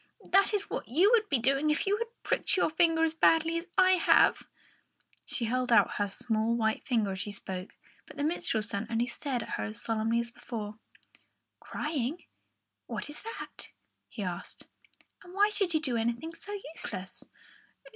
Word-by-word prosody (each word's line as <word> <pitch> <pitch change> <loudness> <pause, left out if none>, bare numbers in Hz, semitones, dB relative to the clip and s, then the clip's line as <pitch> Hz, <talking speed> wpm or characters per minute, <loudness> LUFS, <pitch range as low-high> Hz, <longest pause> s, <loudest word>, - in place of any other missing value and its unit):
That 390 +2 +5
is 410 -2 0
what - - -4
you 350 - +4
would 440 -4 +3
be 280 - +3
doing 275 +5 +2
if 300 - +1
you 400 +1 +2
had 465 +1 -2 0.2
pricked - - +2
your 340 - +2
finger 325 0 +3
as 320 -1 +2
badly 325 0 +3
as 340 - -11
I 370 0 +6
have." 335 - +5 0.9
She 235 - -1
held 250 +2 0
out 210 -4 +4
her 205 - +1
small 220 +3 0
white 220 -2 0
finger 225 -6 +1
as 190 - -5
she 205 - -4
spoke, 190 -2 -7 0.3
but - - -13
the 285 - -1
minstrel's 240 -9 0
son 200 +2 -3
only 230 +1 +1
stared 255 -2 -3
at - - -11
her 105 - -2
as 105 +1 -6
solemnly 225 +1 0
as 235 0 -3
before. 215 -3 -7 0.8
"Crying? 300 +1 -3 0.6
What - - -5
is 295 - -7
that?" 455 +2 -6 0.4
he 210 - -6
asked. 180 -2 -6 0.6
"And 355 +1 -13
why 410 +1 +4
should 390 -5 0
you - - +4
do 260 -6 -1
anything 235 +8 -2
so 410 +5 -6 0.2
useless? 185 - -5
255 Hz, 180 wpm, -30 LUFS, 220-330 Hz, 0.9 s, I